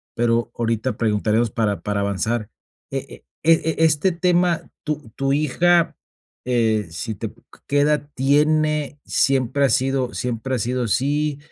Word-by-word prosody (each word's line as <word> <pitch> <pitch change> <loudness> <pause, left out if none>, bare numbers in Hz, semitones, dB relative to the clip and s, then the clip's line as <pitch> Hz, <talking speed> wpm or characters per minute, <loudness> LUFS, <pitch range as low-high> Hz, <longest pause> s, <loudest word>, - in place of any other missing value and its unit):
Pero 115 0 +1
ahorita 115 +2 -1
preguntaremos 110 +1 +1
para 105 -3 -1
para 105 -1 -2
avanzar. 105 +3 -1 0.4
Eh - - -3
eh, - - -12 0.2
e 160 0 +3
este 160 +4 +3
tema, 175 0 +1
¿tu 150 -7 -4
tu 135 0 0
hija, 170 +4 +2 0.5
eh, 110 -5 +1
si 110 +7 -4
te 110 0 -5 0.4
que 145 0 +2
edad 150 0 +1
tiene? 150 +2 +1
¿Siempre 135 0 +2
ha - - +2
sido 130 0 +1
siempre 125 +1 -2
ha - - -2
sido 125 +2 -1
así? 145 +5 0
130 Hz, 140 wpm, -22 LUFS, 115-150 Hz, 0.5 s, e